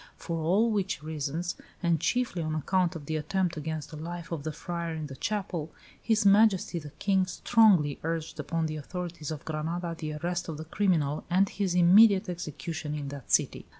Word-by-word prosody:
For 165 -1 -4
all 200 +8 +3
which 190 -8 -1
reasons, 160 +3 -3 0.3
and 170 -2 +2
chiefly 235 0 0
on 155 -1 -2
account 180 +3 +1
of 155 -3 -7
the 155 +1 -1
attempt 175 +3 -1
against 155 0 -4
the 155 - -7
life 170 +2 -6
of 165 -3 -3
the 155 +2 -3
friar 170 +1 -4
in 155 -1 -4
the 135 -2 -8
chapel, 180 -3 -3 0.3
His 220 -2 +2
Majesty 200 -3 +4
the 150 -2 -9
King 190 +4 +1
strongly 190 -10 +4
urged 165 0 -3
upon 165 -1 -1
the 155 -1 -3
authorities 170 0 -5
of 155 0 -6
Granada 165 +2 -3
the 155 -1 -5
arrest 175 +3 -3
of 155 - -4
the 160 - -7
criminal 160 -5 +1
and 190 +3 +4
his 190 -4 -1
immediate 190 +3 +6
execution 160 -2 -4
in 145 -2 -4
that 140 -3 -9
city." - - +2
170 Hz, 185 wpm, -29 LUFS, 155-185 Hz, 0.3 s, immediate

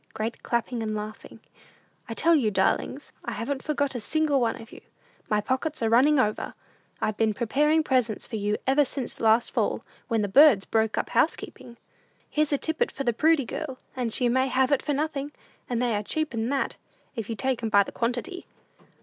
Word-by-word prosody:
(Great 225 +2 -4
clapping 235 0 -2
and 215 -1 -2
laughing.) 215 +1 -7 0.7
"I 225 - -4
tell 335 +7 +4
you, 265 -9 +3
darlings, 210 +8 -1
I 235 - -4
haven't 265 +5 -3
forgot 285 -2 -1
a 245 - -3
single 295 +3 +1
one 235 +1 0
of 225 +1 -12
you. - - -12 0.5
My 210 -1 +2
pockets 260 +4 -2
are 225 - +1
running 275 +5 +5
over. 215 -3 -1 0.4
I've 215 - -1
been 220 -2 +1
preparing 300 +8 +2
presents 250 -7 0
for - - -6
you 210 0 0
ever 270 +3 +4
since 270 -2 -5
last 225 +1 +3
fall, - - -1 0.2
when 225 -4 +1
the - - 0
birds 250 -2 +6
broke 220 -1 0
up - - -2
housekeeping. 235 -1 -1 0.5
"Here's 305 0 0
a 285 - +3
tippet 320 - -1
for 275 - -4
the 240 -3 +1
Prudy 310 +2 +3
girl, 265 +2 -5 0.2
and 245 -3 -2
she 245 +2 +2
may 260 +2 +2
have 265 +1 +1
it 285 - +3
for 295 - -1
nothing; 290 -1 -2 0.4
and 240 -2 -1
they 240 -3 +1
are 205 - 0
cheaper 310 +5 -2
'n 225 +1 -1
that, 275 -1 -1 0.4
if 225 -3 -5
you 225 - -2
take 255 +4 -1
'em 225 - -1
by 200 -2 +5
the - - -9
quantity. 245 +11 -3
245 Hz, 200 wpm, -26 LUFS, 225-285 Hz, 0.7 s, birds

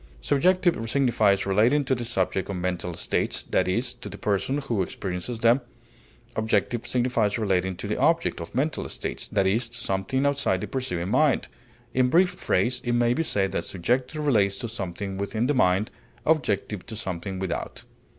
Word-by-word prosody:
Subjective 165 - +2
signifies 110 -7 +3
relating 110 +9 +3
to 130 - 0
the 120 -2 -2
subject 95 -4 -1
of 100 - -2
mental 90 -1 -2
states, - - -1
that - - +1
is, 120 +7 0
to 120 - -9
the - - -8
person 105 +7 0
who 120 -8 -1
experiences 95 +5 -4
them; 120 +3 +5 0.7
objective 110 +1 0
signifies 120 -4 +1
relating 95 -4 0
to 95 +3 -6
the 105 - -2
object 165 - +2
of 85 - -8
mental 145 +5 -1
states, - - -4
that 100 -2 +1
is, 115 +5 +1
to 120 - -8
something 115 +5 -1
outside 140 -10 +1
the - - -2
perceiving 90 -10 -2
mind; 135 +3 +2 0.4
in 125 0 +3
brief 180 +6 +4
phrase 125 -8 0
it 120 - 0
may 120 0 +3
be 145 - 0
said 100 -11 0
that - - -1
subjective 130 - -1
relates 100 -8 +3
to 120 - -4
something 95 -2 -5
within 110 +3 -1
the 145 - +2
mind, 95 -4 +2 0.3
objective 105 - 0
to 110 - -6
something 95 -1 -4
without. 95 -2 -4
115 Hz, 175 wpm, -26 LUFS, 95-130 Hz, 0.7 s, them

